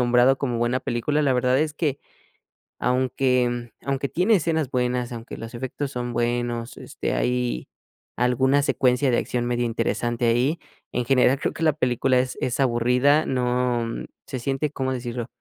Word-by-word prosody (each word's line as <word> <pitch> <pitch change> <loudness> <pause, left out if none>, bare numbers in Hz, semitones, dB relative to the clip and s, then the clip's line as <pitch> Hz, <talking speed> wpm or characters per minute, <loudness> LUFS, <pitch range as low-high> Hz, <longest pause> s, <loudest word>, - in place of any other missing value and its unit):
nombrado 125 +2 +4
como 125 -4 -1
buena 120 +2 +1
película. 135 +6 0
La 140 -2 +3
verdad 125 +1 +2
es 150 0 0
que 145 -4 -1 0.8
aunque 125 -2 +1
aunque 140 0 -1
tiene 190 +6 +3
escenas 160 -5 0
buenas, 125 -1 0
aunque 115 0 -8
los 115 +1 -8
efectos 130 +3 -4
son 120 -2 -3
buenos, 120 0 -1
este, - - -4
hay - - -1 0.5
alguna 130 +3 +3
secuencia 130 -1 +2
de 120 - +2
acción 120 -1 -2
medio 120 0 0
interesante 120 +1 -1
ahí. 125 +8 +2 0.3
En 125 - -1
general 130 +1 +3
creo - - -1
que 165 - -5
la 155 -2 +4
película 130 -2 +2
es 125 0 -2
es 125 +1 -1
aburrida, 125 +4 +3
no 125 -2 0 0.4
se 130 - -4
siente, 135 +4 -1
¿cómo 130 -2 -2
decirlo? 120 -2 -4
125 Hz, 160 wpm, -24 LUFS, 120-135 Hz, 0.8 s, nombrado